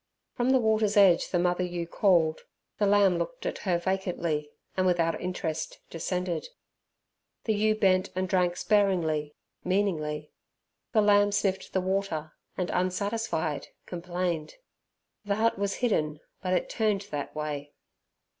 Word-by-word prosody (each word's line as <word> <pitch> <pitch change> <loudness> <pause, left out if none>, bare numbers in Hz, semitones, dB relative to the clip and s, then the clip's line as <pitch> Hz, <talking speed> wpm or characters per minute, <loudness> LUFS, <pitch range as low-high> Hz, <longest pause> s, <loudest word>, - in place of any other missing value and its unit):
From 245 0 0
the 265 - +6
water's 220 -3 +2
edge 190 -4 +6
the 180 - +1
mother 180 +1 +1
ewe 175 -1 -3
called. 170 -3 +2 0.4
The 205 - +3
lamb 200 -3 +4
looked 250 +10 -4
at - - -2
her 180 -3 +1
vacantly, 170 -5 -1 0.3
and 185 0 +2
without 170 -2 +1
interest 160 -3 -3
descended. 180 +1 -2 1.0
The 220 - +1
ewe 215 +1 +2
bent 190 -2 +3
and 185 0 0
drank 180 -2 +1
sparingly, 170 -8 +1 0.3
meaningly. 155 -6 -1 0.6
The 220 - +4
lamb 205 0 +5
sniffed 200 -2 0
the 190 - +1
water, 185 -5 -2 0.2
and, 180 -1 -1
unsatisfied, 185 -3 -1 0.2
complained. 175 -2 -3 0.7
The 200 -1 0
hut 225 -1 +1
was 200 -1 0
hidden, 155 -9 0 0.2
but 185 -1 -1
it 180 - +1
turned 215 -3 0
that 145 0 -4
way. 145 -1 -4
185 Hz, 135 wpm, -28 LUFS, 165-205 Hz, 1.0 s, the